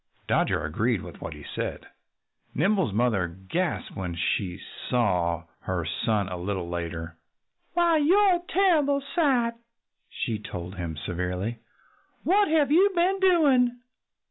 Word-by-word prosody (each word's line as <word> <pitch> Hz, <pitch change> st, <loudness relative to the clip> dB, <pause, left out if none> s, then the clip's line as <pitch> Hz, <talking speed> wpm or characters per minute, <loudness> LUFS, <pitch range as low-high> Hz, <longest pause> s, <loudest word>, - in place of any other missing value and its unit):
Dodger -, -, +1 dB
agreed 105 Hz, +7 st, 0 dB
with -, -, -11 dB
what -, -, -6 dB
he -, -, -11 dB
said. -, -, -4 dB, 0.7 s
Nimble's 190 Hz, -, +2 dB
mother 110 Hz, -4 st, +1 dB
gasped 95 Hz, -, -3 dB
when 90 Hz, -3 st, -4 dB
she 90 Hz, +2 st, -1 dB, 0.3 s
saw 90 Hz, -9 st, +1 dB, 0.2 s
her 90 Hz, -3 st, -3 dB
son 100 Hz, +5 st, 0 dB
a 90 Hz, -1 st, -5 dB
little 90 Hz, 0 st, -3 dB
later. 85 Hz, -1 st, -5 dB, 0.6 s
"You're 345 Hz, +3 st, +4 dB
a -, -, -11 dB
terrible 300 Hz, -7 st, +3 dB
sight!" 260 Hz, -8 st, +2 dB, 0.6 s
she 110 Hz, -3 st, -3 dB
told 90 Hz, -3 st, -7 dB
him 85 Hz, -4 st, -5 dB
severely. 90 Hz, +7 st, -3 dB, 0.6 s
"What 405 Hz, +4 st, +4 dB
have 300 Hz, -3 st, +2 dB
you 370 Hz, +6 st, +6 dB
been 365 Hz, +3 st, +2 dB
doing?" 280 Hz, -10 st, +4 dB
115 Hz, 125 wpm, -26 LUFS, -, 0.7 s, you